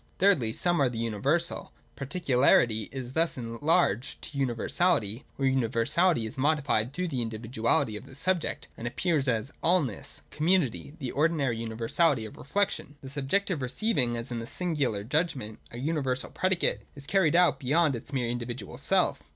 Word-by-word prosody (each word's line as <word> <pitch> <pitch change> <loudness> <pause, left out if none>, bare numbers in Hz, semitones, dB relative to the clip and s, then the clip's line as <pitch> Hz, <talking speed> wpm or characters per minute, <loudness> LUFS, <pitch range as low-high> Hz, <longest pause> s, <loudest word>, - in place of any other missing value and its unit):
(3) 195 - +5
Thirdly, 125 - +2
Some 175 +6 +1
are 135 - +4
the 120 - -6
universal: 125 - -1 0.2
particularity 130 - +2
is 130 -2 -6
thus 165 0 +1
enlarged 125 - 0
to - - -7
universality: 125 - +1
or 135 - 0
universahty 130 +4 +2
is 110 +4 -5
modified 140 -5 +1
through 180 +5 -2
the 130 -5 -2
individuality 115 -1 0
of 105 - -8
the 130 - -12
subject, 180 +3 -1
and 115 - -5
appears 150 +2 0
as 115 +2 0
allness 160 - 0
Community, 155 -4 0
the 130 -6 -4
ordinary 145 -6 +1
universality 115 +4 +1
of 110 - -10
reflection). 195 -2 -2
The 135 - -9
subject, 145 +9 0
receiving, 130 - 0
as 115 +1 -3
in 120 - -2
the 115 - -6
Singular 145 - -1
judgment, 130 -4 -1
a 120 - -9
uni 150 +5 -1
versal 130 -1 -2
predicate, 185 -1 +1
is 140 -1 -11
carried 170 -2 +2
out 175 -6 +4
beyond 150 +2 +2
its 120 +5 -7
mere 130 -4 -1
individual 120 +1 -5
self. - - +2
135 Hz, 160 wpm, -28 LUFS, 115-165 Hz, 0.2 s, 3